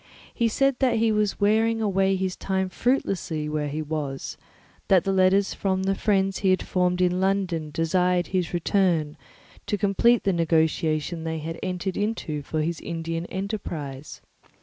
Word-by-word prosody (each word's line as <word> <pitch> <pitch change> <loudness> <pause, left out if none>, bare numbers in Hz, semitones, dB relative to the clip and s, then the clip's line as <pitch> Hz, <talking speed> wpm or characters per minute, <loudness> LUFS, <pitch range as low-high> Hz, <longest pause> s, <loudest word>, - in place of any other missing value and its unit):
He 235 - +1
said 275 +3 +1
that 260 -3 +2
he 225 0 +2
was 210 -1 0
wearing 220 +2 +2
away 195 -2 +2
his 185 0 -2
time 190 -1 -1
fruitlessly 185 - -1
where 150 -1 -2
he 150 +2 -3
was, 145 -3 -4 0.5
that 190 -3 +4
letters 195 +1 +3
from 190 -1 -1
the 195 0 +1
friends 195 -1 +1
he 195 - +2
had 185 -1 +2
formed 180 0 0
in 180 0 +2
London 190 -5 0
desired 175 +3 +1
his 185 -3 -1
return 175 -4 +1 0.5
to 205 - 0
complete 210 +4 +3
the 195 - +2
negotiation 160 -1 +1
they 160 0 -3
had 165 +2 -5
entered 185 0 -3
into 205 -8 -2
for 155 +2 -2
his 170 0 -2
Indian 165 0 -4
enterprise. 160 -8 -5
185 Hz, 155 wpm, -25 LUFS, 160-195 Hz, 0.5 s, that